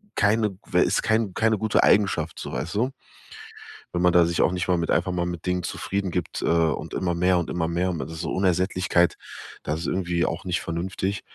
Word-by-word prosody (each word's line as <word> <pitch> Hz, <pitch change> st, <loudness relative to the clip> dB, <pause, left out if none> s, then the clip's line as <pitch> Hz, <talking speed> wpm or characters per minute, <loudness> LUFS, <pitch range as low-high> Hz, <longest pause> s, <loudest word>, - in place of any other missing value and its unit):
keine 105 Hz, -1 st, +2 dB
w -, -, +2 dB
ist -, -, +1 dB
kein 110 Hz, -3 st, +1 dB
keine 110 Hz, +2 st, +2 dB
gute 110 Hz, 0 st, +2 dB
Eigenschaft 85 Hz, -6 st, +2 dB
so, -, -, -6 dB
weißt 85 Hz, +6 st, -4 dB
du?“ 125 Hz, +5 st, +1 dB, 1.0 s
Wenn 90 Hz, -, -1 dB
man 90 Hz, 0 st, +5 dB
da 85 Hz, 0 st, +5 dB
sich 85 Hz, 0 st, 0 dB
auch -, -, +3 dB
nicht 90 Hz, 0 st, -2 dB
mal 90 Hz, -1 st, +2 dB
mit 85 Hz, -1 st, -2 dB
einfach 90 Hz, +2 st, +1 dB
mal 85 Hz, -1 st, -1 dB
mit 85 Hz, -1 st, -6 dB
Dingen 90 Hz, 0 st, 0 dB
zufrieden 95 Hz, +2 st, -3 dB
gibt, 90 Hz, -2 st, -3 dB
äh, -, -, -1 dB
und 85 Hz, -1 st, +1 dB
immer 90 Hz, -2 st, 0 dB
mehr 90 Hz, +1 st, +2 dB
und 85 Hz, -, -2 dB
immer 85 Hz, -2 st, -1 dB
mehr 90 Hz, +2 st, 0 dB
und 85 Hz, -, -4 dB
das 80 Hz, -, -5 dB
ist 80 Hz, -, -6 dB
so 80 Hz, -, -3 dB
Unersättlichkeit, 90 Hz, -2 st, +2 dB, 0.5 s
das 75 Hz, +2 st, -3 dB
ist 85 Hz, -, -4 dB
irgendwie 85 Hz, -2 st, 0 dB
auch 80 Hz, -, -3 dB
nicht 90 Hz, -1 st, -1 dB
vernünftig. 95 Hz, +4 st, -3 dB
90 Hz, 220 wpm, -25 LUFS, 85-95 Hz, 1.0 s, man